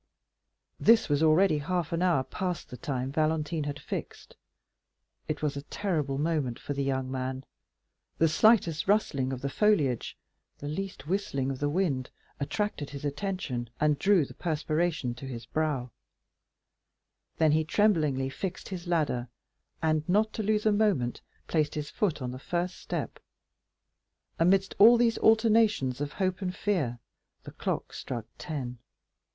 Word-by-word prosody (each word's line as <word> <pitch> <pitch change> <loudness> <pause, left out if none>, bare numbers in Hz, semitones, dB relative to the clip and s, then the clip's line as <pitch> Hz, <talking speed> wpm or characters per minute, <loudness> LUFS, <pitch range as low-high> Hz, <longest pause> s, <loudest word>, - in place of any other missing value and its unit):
This 225 -4 +5
was 145 0 +2
already 160 +1 +4
half 170 +2 -2
an 165 - 0
hour 175 -7 +3
past 180 +6 -4
the - - -5
time 135 -4 -3
Valentine 155 +1 0
had 145 0 -4
fixed. - - -6 0.9
It 155 - -3
was 145 -2 0
a 140 - -4
terrible 150 -4 -2
moment 150 -5 0
for 145 - -5
the 140 0 -1
young 130 -1 -1
man. 130 0 -3 0.7
The 165 - +4
slightest 170 -1 +3
rustling 140 -11 +2
of 130 -1 -4
the 140 - -1
foliage, 150 - +1 0.4
the 145 - -7
least 160 -2 -5
whistling 150 -7 -1
of 130 - -5
the 145 - 0
wind, 145 -6 0 0.3
attracted 150 +1 -2
his 140 0 -7
attention, 145 - -3
and 150 -1 +2
drew 195 -4 +4
the - - -11
perspiration 155 -4 -1
to 125 +3 -9
his 120 -3 -6
brow; 145 -6 -1 1.5
then 160 -2 +4
he 160 +1 +3
tremblingly 155 -8 +2
fixed 185 +5 -5
his 180 -2 -6
ladder, 150 -8 0 0.6
and, 155 -1 +2
not 215 +4 +3
to - - -2
lose 215 0 +1
a 215 - +5
moment, 205 - +1 0.2
placed 155 -2 0
his 150 -1 -4
foot 165 -10 -1
on 125 - -3
the 130 - -7
first 175 +5 -2
step. - - -4 1.2
Amidst 190 +3 +3
all 230 +4 +9
these 230 -1 +2
alternations 220 - +3
of 145 0 -3
hope 185 0 -1
and 180 -1 -2
fear, 165 - 0 0.5
the - - -9
clock - - -3
struck 120 -4 -5
ten. 125 -6 -5
155 Hz, 150 wpm, -29 LUFS, 135-190 Hz, 1.5 s, all